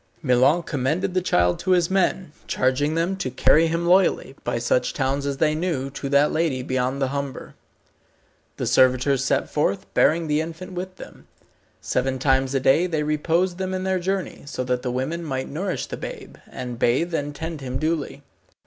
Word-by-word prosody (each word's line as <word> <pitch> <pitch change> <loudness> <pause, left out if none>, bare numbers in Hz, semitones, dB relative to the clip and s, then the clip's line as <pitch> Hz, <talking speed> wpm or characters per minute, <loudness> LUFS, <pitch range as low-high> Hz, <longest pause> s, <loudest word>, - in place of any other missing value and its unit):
Milon 135 +6 +3
commended 155 +7 -1
the 185 - +1
child 90 - +2
to 185 - +1
his 175 -1 +2
men, 190 -3 +1 0.2
charging 140 +4 +1
them 170 +4 0
to 135 - -2
carry 155 +5 +4
him 165 +1 -1
loyally, 180 -6 +3
by - - -1
such 120 +1 0
towns 140 0 -1
as 140 -1 -2
they 155 +1 +2
knew, 155 -5 -2
to 140 0 -5
that 140 +2 +4
lady 155 -6 0
beyond 130 +1 -1
the 135 -2 0
Humber. 140 -1 -5 1.0
The - - -2
servitors 130 +1 +3
set 135 0 +1
forth, 100 -10 0
bearing 165 +1 +3
the 150 +1 +1
infant 165 +4 -7
with 185 +1 -6
them. - - -13 0.5
Seven 130 +1 -1
times 135 0 +1
a - - +3
day 135 +7 +3
they 160 -4 -1
reposed 165 +4 0
them 190 0 -2
in 185 - -3
their 190 -1 0
journey, 190 +1 -3
so 130 - -3
that 125 0 -1
the 125 - -3
women 135 +7 -2
might 135 -4 -3
nourish 180 +5 -3
the - - -6
babe, - - -8
and 125 -2 -6
bathe 165 +9 +1
and 145 -2 -2
tend 160 0 -5
him 130 -1 -3
duly. 155 -1 -2
150 Hz, 185 wpm, -23 LUFS, 130-170 Hz, 1.0 s, carry